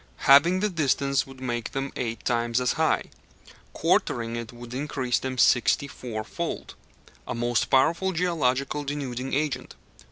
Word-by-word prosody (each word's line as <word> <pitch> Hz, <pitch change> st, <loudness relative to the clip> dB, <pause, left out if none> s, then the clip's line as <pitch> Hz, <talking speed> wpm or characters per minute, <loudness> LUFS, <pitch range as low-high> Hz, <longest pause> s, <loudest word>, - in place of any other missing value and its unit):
Halving 165 Hz, +7 st, +6 dB
the 210 Hz, -, +1 dB
distance 140 Hz, -4 st, +1 dB
would 135 Hz, -1 st, -12 dB
make 120 Hz, -3 st, -3 dB
them 135 Hz, 0 st, -3 dB
eight 115 Hz, -2 st, -4 dB
times 120 Hz, 0 st, +1 dB
as 125 Hz, -1 st, +1 dB
high; -, -, +1 dB, 0.7 s
quartering 115 Hz, -1 st, 0 dB
it 115 Hz, -1 st, -5 dB
would 120 Hz, 0 st, -10 dB
increase 130 Hz, -2 st, -1 dB
them 130 Hz, -1 st, -4 dB
sixty 125 Hz, +4 st, +3 dB
four 115 Hz, -6 st, -6 dB
fold. 170 Hz, +9 st, -5 dB, 0.5 s
A -, -, -3 dB
most 120 Hz, +1 st, +1 dB
powerful 165 Hz, +8 st, +3 dB
geological 150 Hz, -5 st, 0 dB
denuding 135 Hz, -3 st, -3 dB
agent. 145 Hz, -3 st, -2 dB
130 Hz, 140 wpm, -26 LUFS, 120-145 Hz, 0.7 s, Halving